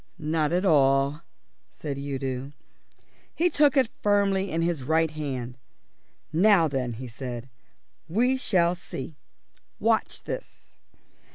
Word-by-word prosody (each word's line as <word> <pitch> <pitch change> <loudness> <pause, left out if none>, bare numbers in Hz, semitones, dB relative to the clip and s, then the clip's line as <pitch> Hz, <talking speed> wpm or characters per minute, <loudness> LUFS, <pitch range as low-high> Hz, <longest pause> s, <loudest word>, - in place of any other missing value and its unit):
"Not 155 0 0
at 180 +3 +1
all," 140 -2 +3 0.5
said 140 -3 -6
Udo. 135 -1 -4 0.8
He 350 +1 +2
took 290 -2 +4
it 255 -4 +3
firmly 200 -1 +2
in 165 0 0
his 170 -4 -1
right 160 +4 +1
hand. 130 -5 -5 0.7
"Now 185 0 +5
then," 130 -4 -2
he 125 +3 -7
said, 120 +1 -6 0.6
"we 245 +9 +2
shall 175 -9 +2
see. 150 -4 -8 0.6
Watch - - 0
this." - - -8
155 Hz, 115 wpm, -26 LUFS, 135-190 Hz, 0.8 s, Now